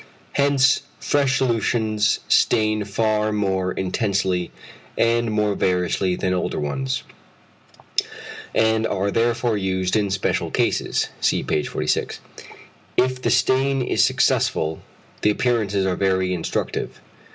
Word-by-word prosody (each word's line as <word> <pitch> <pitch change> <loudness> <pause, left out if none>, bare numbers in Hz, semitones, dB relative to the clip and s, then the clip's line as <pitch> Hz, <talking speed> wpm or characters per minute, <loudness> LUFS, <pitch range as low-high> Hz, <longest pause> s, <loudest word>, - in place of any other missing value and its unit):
Hence 140 -1 +3 0.2
fresh 140 -2 +1
solutions 110 -3 +1
stain 110 -1 +2
far 110 +1 0
more 95 -3 0
intensely 95 -2 -1 0.5
and 115 0 +2
more 105 -1 +1
variously 90 0 0
than 90 0 -1
older 90 - -2
ones, 130 - -2 1.5
and 110 0 +2
are 100 +1 -1
therefore 115 0 +1
used 95 -1 -1
in 105 -2 +1
special 95 0 -1
cases - - 0
(see - - +1
page 75 - -1
46). - - -2 0.8
If 130 0 +1
the - - 0
stain 135 0 +2
is - - +2
successful 80 0 +1 0.4
the 105 - +3
appearances 105 -4 0
are 95 -1 0
very 95 -1 +1
instructive. 85 -2 -3
105 Hz, 115 wpm, -22 LUFS, 95-120 Hz, 1.5 s, Hence